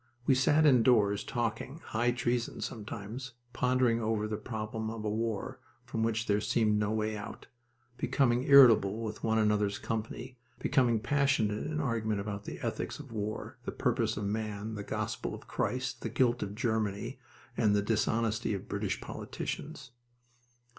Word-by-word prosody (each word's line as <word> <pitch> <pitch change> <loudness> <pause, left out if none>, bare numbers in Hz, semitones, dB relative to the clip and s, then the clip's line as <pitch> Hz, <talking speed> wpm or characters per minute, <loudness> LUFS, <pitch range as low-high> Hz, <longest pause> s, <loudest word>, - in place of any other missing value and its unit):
We 135 - +5
sat 145 +4 +4
indoors 115 -6 +5
talking 120 +5 -3
high 120 +2 +1
treason 120 -1 -1
sometimes 110 +4 -6 0.2
pondering 125 -1 +2
over 110 -1 0
the 110 - -2
problem 110 0 -4
of 110 -1 -5
a - - +1
war 110 -1 -2 0.3
from 110 - -3
which 115 0 0
there 105 -1 +2
seemed 105 -2 +2
no 105 -1 +1
way 110 0 -1
out, 105 - -7 0.5
becoming 125 -1 +2
irritable 115 -6 +7
with 110 -1 -5
one 110 0 +2
another's 105 -2 +2
company, 115 +3 -5 0.2
becoming 125 -5 +2
passionate 135 -5 +1
in 155 0 -2
argument 110 -7 0
about 100 0 -5
the - - -6
ethics - - -3
of - - -11
war, 105 -1 -4
the - - -3
purpose - - 0
of 105 - -2
man, 105 +1 -3
the 105 - -4
gospel - - -3
of - - -13
Christ, 125 -1 -2
the 115 - -3
guilt 120 +1 +2
of 100 0 -4
Germany, 110 -4 -1 0.4
and 105 -1 +3
the 100 - +2
dishonesty 110 0 +1
of 95 - -7
British 100 -1 -2
politicians. 145 -4 -6
110 Hz, 155 wpm, -31 LUFS, 105-125 Hz, 0.5 s, irritable